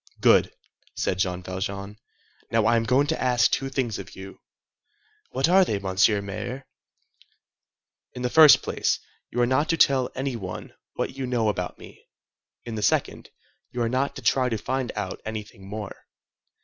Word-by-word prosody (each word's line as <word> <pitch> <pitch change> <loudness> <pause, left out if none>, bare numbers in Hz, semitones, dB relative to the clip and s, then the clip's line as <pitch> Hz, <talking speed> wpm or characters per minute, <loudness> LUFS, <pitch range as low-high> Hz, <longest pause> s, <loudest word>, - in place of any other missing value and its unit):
"Good," - - +5 0.4
said 90 - -1
Jean 90 -2 -1
Valjean. 100 +3 -5 0.5
"Now 115 -1 +2
I 115 +1 +4
am 115 -1 +1
going 130 +4 +3
to 160 +2 -2
ask 125 -3 +3
two 135 - -1
things 130 -5 -2
of 95 -1 -10
you." 95 0 -10 0.9
"What 135 +4 +1
are 190 +2 +6
they, 105 - -1
Mr. 100 +2 +2
Mayor?" 115 +7 -6 1.5
"In 125 - -5
the 125 - +1
first 155 -3 +8
place, - - 0 0.3
you 120 - -4
are - - +5
not 130 +5 +1
to 165 - +2
tell 135 -4 +4
any 135 -1 -2
one 95 -5 -7 0.2
what - - -3
you 130 -1 -3
know 120 -3 +1
about 90 -3 -3
me. - - -14 0.6
In 115 - -6
the 110 - -3
second, - - 0 0.4
you 125 - -6
are 115 - 0
not 130 +3 -1
to 135 - -9
try 130 +3 +2
to 115 - -1
find 130 +3 -2
out 105 -3 -4
anything 105 -3 -7
more." 105 -1 -7
115 Hz, 175 wpm, -25 LUFS, 100-130 Hz, 1.5 s, first